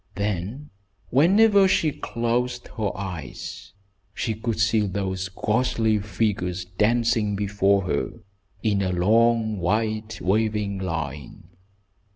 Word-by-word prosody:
Then, 105 - -3 0.4
whenever 200 - +5
she 160 -4 +2
closed 120 0 -2
her 110 -3 -2
eyes, 90 -9 -7 0.4
she 115 - -1
could 110 +1 -3
see 110 -2 +2
those 95 -1 -3
ghostly 110 +2 +1
figures 95 -3 -1
dancing 110 +2 +1
before 100 -1 +2
her 90 - -1 0.5
in 105 -3 +1
a 95 -1 0
long, 110 +3 +2
white 110 +4 -1
wavering 105 0 0
line. 80 -7 -5
105 Hz, 105 wpm, -24 LUFS, 95-115 Hz, 0.5 s, whenever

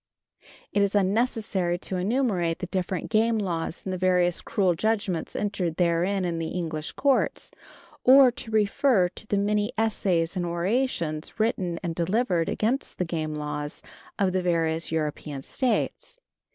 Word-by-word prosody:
It 205 - +3
is 200 0 +1
unnecessary 200 -3 +1
to 185 +1 -4
enumerate 185 -5 0
the - - -4
different 185 +2 -3
game 225 +1 +3
laws 175 -5 -3
and 190 - -2
the 185 - -4
various 180 -1 +2
cruel 190 -3 +1
judgments 200 -2 -1
entered 195 -5 -1
therein 180 +3 +1
in 170 -2 -2
the 165 - -2
English 160 -3 -4
courts, 275 -2 +1 0.5
or 260 0 +8
to 230 - -6
refer 215 -1 +3
to 215 - -7
the 205 - 0
many 210 +1 +1
essays 190 -6 +1
and 180 - -1
orations 175 -2 -1
written 185 -6 0
and 170 -2 -2
delivered 180 0 0
against 240 +6 -1
the 180 - 0
game 155 -2 -3
laws 150 0 -4 0.3
of 190 -2 +1
the 185 - +1
various 165 -2 0
European 150 -3 -3
States. 265 - -2
185 Hz, 150 wpm, -26 LUFS, 170-215 Hz, 0.5 s, or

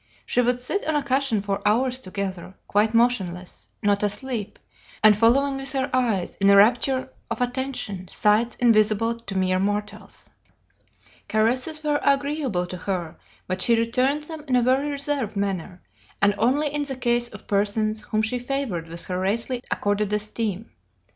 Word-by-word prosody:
She 245 - +1
would 245 0 +1
sit 320 +11 -2
on 315 - +1
a 295 - +1
cushion 265 -6 0
for 200 -1 -2
hours 250 +5 +1
together, 190 -3 -5
quite 215 +2 +1
motionless, 190 -7 0 0.2
not 205 -1 +2
asleep, 210 +1 -3 0.5
and 215 -1 +8
following 270 +6 +3
with 270 0 0
her 265 0 -1
eyes, 230 -8 0
in 195 - +5
a 200 - +7
rapture 250 +5 +3 0.2
of - - -3
attention, 245 -7 -3
sights 215 +6 +2
invisible 225 -1 +3
to 230 -4 -6
mere 185 0 +1
mortals. 205 +1 -4 1.0
Caresses 255 +8 0
were 295 -1 +1
agreeable 280 - 0
to 180 +1 -7
her, 175 -4 -4 0.3
but 185 0 -3
she 235 - +5
returned 255 +6 +1
them 315 -1 -8
in 255 - +1
a 245 - +3
very 265 +4 +2
reserved 280 -6 -1
manner, 190 -2 -3 0.4
and 205 0 +4
only 275 +7 +2
in 295 - 0
the 275 -2 -4
case 240 -1 +1
of 210 -4 -12
persons 215 +2 0
whom 215 +1 -1
she 245 +3 -1
favored 245 -11 -3
with 170 +1 -5
her 180 0 -3
rarely 230 +6 0
accorded 205 0 -1
esteem. 210 0 -2
230 Hz, 160 wpm, -24 LUFS, 200-260 Hz, 1.0 s, and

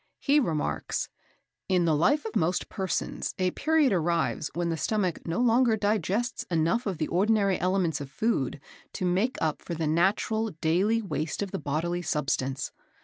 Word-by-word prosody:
He 290 +1 +3
remarks: 155 - -1 0.6
"In 180 -2 +3
the 160 -2 +3
life 285 - +2
of 445 - -5
most 175 +1 0
persons 190 -1 -3
a 185 -1 +1
period 310 - +2
arrives 170 -3 0
when 170 0 0
the 165 - 0
stomach 185 -1 -1
no 165 - -1
longer 240 -1 +4
digests 210 +3 0
enough 170 +8 +1
of 190 -4 -2
the 155 - -1
ordinary 200 +1 +2
elements 180 -5 +1
of 140 - -6
food 145 - -1 0.3
to 185 - -3
make 190 +8 +1
up 155 -2 0
for 170 - -5
the 160 0 -2
natural 200 +7 +1
daily 195 +9 +2
waste 155 0 -2
of 195 - -6
the - - -3
bodily 165 +4 -1
substance. 135 -5 -1
180 Hz, 165 wpm, -27 LUFS, 160-220 Hz, 0.6 s, longer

